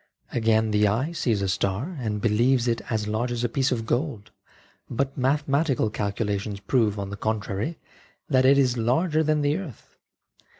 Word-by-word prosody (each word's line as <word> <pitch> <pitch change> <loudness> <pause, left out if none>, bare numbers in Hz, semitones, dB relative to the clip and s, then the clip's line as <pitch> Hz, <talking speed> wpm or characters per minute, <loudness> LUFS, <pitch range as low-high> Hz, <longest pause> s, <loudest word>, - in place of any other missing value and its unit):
Again, 110 -1 +2
the 105 0 +3
eye 120 +11 0
sees 115 -11 0
a - - 0
star 100 - -1
and 105 -4 -2
believes 120 +3 +2
it 115 -1 0
as 110 -3 -1
large 115 +3 -1
as 120 0 -2
a - - +2
piece 135 +3 0
of 115 -3 -1
gold, 120 -3 -2 0.6
but 135 +2 -2
mathematical 140 -2 +1
calcu 105 +1 -2
lations 100 0 -3
prove, 105 0 +1
on 100 -1 -4
the - - -4
contrary, 110 - -2 0.5
that 130 -3 +3
it 135 +2 +6
is 125 -3 +2
larger 155 +8 +1
than 155 -1 +1
the 145 +1 +1
earth. 155 - -11
120 Hz, 175 wpm, -25 LUFS, 105-135 Hz, 0.6 s, it